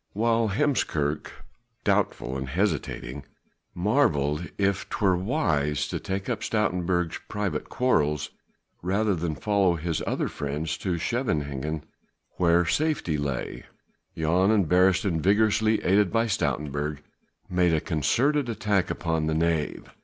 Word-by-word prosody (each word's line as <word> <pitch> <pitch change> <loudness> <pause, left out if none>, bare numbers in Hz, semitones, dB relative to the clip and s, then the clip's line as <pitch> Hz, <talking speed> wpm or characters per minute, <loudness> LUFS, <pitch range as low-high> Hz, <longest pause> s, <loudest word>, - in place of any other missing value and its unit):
While 115 +1 +2
Heemskerk, 85 - 0 0.6
doubtful 65 - 0
and 65 0 -4
hesitating, 70 -6 -2 0.5
marvelled 85 - +1
if 100 -1 0
'twere 95 -4 +2
wise 80 - 0
to - - -3
take 95 0 -4
up 115 -4 -2
Stoutenburg's 90 -6 0
private 105 -2 -2
quarrels 75 - +1 0.5
rather 100 +4 +1
than 80 -3 -2
follow 100 -3 +2
his 80 0 -2
other - - 0
friends 75 +3 -3
to 90 -3 -1
Scheveningen 75 - -2 0.5
where 85 -1 +4
safety 150 - 0
lay, 70 -3 -4 0.5
Jan 85 +5 +2
and 105 -6 +3
Beresteyn 90 -1 +3
vigorously 110 +3 +3
aided 100 0 +3
by 115 +1 +2
Stoutenburg 75 - -2 0.4
made 90 -2 +2
a - - +2
concerted 120 - +1
attack 105 -4 0
upon 80 -2 -1
the 80 - 0
knave. 80 -2 -1
90 Hz, 120 wpm, -26 LUFS, 75-105 Hz, 0.6 s, where